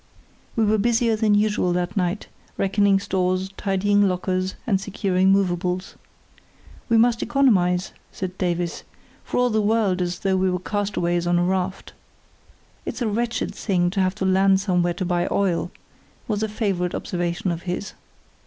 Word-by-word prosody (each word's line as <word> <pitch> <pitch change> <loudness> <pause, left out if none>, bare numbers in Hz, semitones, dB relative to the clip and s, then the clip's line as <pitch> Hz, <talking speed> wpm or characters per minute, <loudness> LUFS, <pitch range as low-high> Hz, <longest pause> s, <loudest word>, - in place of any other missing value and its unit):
We 225 - +2
were 215 +1 +2
busier 230 +1 +2
than 215 -1 +2
usual 205 -4 +1
that 180 +1 -2
night, 185 +1 -1 0.3
reckoning 200 0 +3
stores, 185 -1 -1
tidying 205 0 +2
lockers, 185 +1 -1
and 195 -6 +1
securing 190 -2 +1
movables. 185 -1 0 1.0
"We 230 - +4
must 230 0 +3
economise," 195 -9 +2 0.2
said 185 -1 -5
Davies, 175 -2 -1 0.4
for - - -4
all 245 0 +3
the 215 0 +2
world 205 -3 +1
as 175 0 -2
though 190 -1 +1
we 185 0 +2
were 180 - 0
castaways 180 -3 -1
on 175 0 +3
a 175 - +2
raft. 185 +1 -2 0.9
"It's 250 - -4
a - - 0
wretched 230 +2 -1
thing 175 -4 0
to 195 0 0
have 185 0 +1
to 195 - -2
land 190 +1 +4
somewhere 180 -3 +1
to 185 - -3
buy 175 0 0
oil," 180 -3 0 0.6
was 210 -2 -1
a 220 - -1
favourite 195 -5 -1
observation 175 +1 -2
of 170 0 -4
his. 180 +3 -4
190 Hz, 160 wpm, -23 LUFS, 180-210 Hz, 1.0 s, We